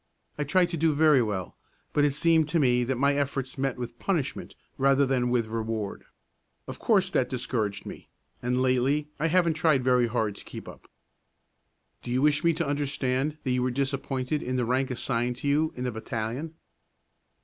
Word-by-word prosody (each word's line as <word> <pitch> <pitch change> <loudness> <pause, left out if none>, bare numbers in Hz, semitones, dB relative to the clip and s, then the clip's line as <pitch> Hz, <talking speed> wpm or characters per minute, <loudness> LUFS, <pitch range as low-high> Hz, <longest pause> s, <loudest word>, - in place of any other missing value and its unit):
I 150 - -2
tried 180 +4 +3
to 170 - -3
do 160 -1 +2
very 150 -3 +5
well, 100 -6 -3 0.4
but 145 - +3
it 145 -2 +2
seemed 160 0 +3
to 165 - +1
me 125 -3 +3
that 130 0 -1
my 140 +2 +3
efforts 135 -2 -2
met 135 -2 -1
with 120 -1 -6
punishment 160 -8 -2 0.2
rather 135 +1 +4
than 125 -2 +1
with 120 -2 +1
reward. 110 -2 -4 0.6
Of - - -7
course 195 -4 +2
that 130 - +1
discouraged 110 -5 -2
me, - - -9 0.3
and 125 +1 0
lately 130 +4 +1
I 160 - +1
haven't 170 0 +3
tried 155 -4 +2
very 125 -1 +3
hard 110 -3 -1
to - - -11
keep - - -9
up." - - -12 1.1
"Do - - -8
you 125 +3 +1
wish 150 0 +3
me 170 - +5
to 165 0 -2
understand 140 0 -1
that 130 - -1
you 125 0 +1
were 130 - +1
disappointed 135 +1 -2
in 130 - -3
the 125 -2 +1
rank 130 +2 0
assigned 125 -1 -1
to 145 - -5
you 155 +3 +2
in 125 - -5
the 125 - -1
battalion?" 115 +7 -4
135 Hz, 190 wpm, -27 LUFS, 125-150 Hz, 1.1 s, very